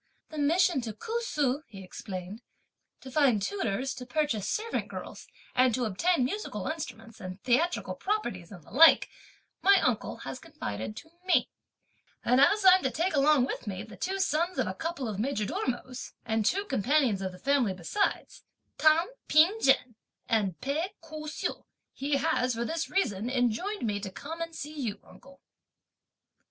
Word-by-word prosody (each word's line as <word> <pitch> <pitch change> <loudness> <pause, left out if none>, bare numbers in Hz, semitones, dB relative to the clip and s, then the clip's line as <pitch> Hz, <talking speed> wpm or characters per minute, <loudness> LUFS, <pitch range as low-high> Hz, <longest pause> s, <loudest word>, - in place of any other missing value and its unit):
"The 310 - -6
mission 325 0 +3
to 225 -2 -5
Ku 455 - -3
Su," 290 - 0
he 195 -3 -10
explained, 185 +3 -7 0.6
"to 260 - -10
find 265 -7 +4
tutors, 255 - -2
to 255 - -8
purchase 245 -6 -1
servant 450 +2 -2
girls, - - -8 0.3
and 255 -2 +4
to 250 - 0
obtain 255 - +2
musical 415 +12 -4
instruments, 235 -9 -6
and 185 +1 -7
theatrical 285 +8 +1
properties 215 - -3
and 180 -5 -11
the - - -18
like, 320 +8 +7 0.5
my 395 0 +6
uncle 250 -8 0
has 135 -1 -5
confided 105 - -6
to 285 +8 -11
me; 370 -1 +2 0.7
and 250 +2 +4
as 410 +5 +4
I'm 370 0 +8
to 265 - +1
take 335 +9 -1
along 285 -2 +4
with 255 - -5
me 190 0 -4
the 220 - -11
two 385 +1 -2
sons 345 +1 +1
of - - +2
a - - -3
couple 325 -6 -4
of 205 -3 -4
majordomos, 250 +1 -3
and 220 -1 0
two 400 +2 +1
companions 260 - +2
of 190 -1 -2
the 180 - -12
family, 255 -4 +1
besides, 185 - -2 0.4
Tan 315 +2 +5 0.2
P'ing 350 +9 +5
jen 265 -2 +3 0.3
and 200 -6 0
Pei 320 +9 -2
Ku 310 -1 -8
hsiu, 305 - -4 0.3
he 280 +1 -1
has, 250 -2 +1
for 235 +1 -2
this 325 +5 -2
reason, 235 - 0
enjoined 255 - 0
me 205 -2 -1
to 200 -1 -5
come 320 - -7
and 330 0 -4
see 300 -1 -6
you, 235 -9 -3
uncle." 275 0 -17
265 Hz, 165 wpm, -29 LUFS, 220-325 Hz, 0.7 s, I'm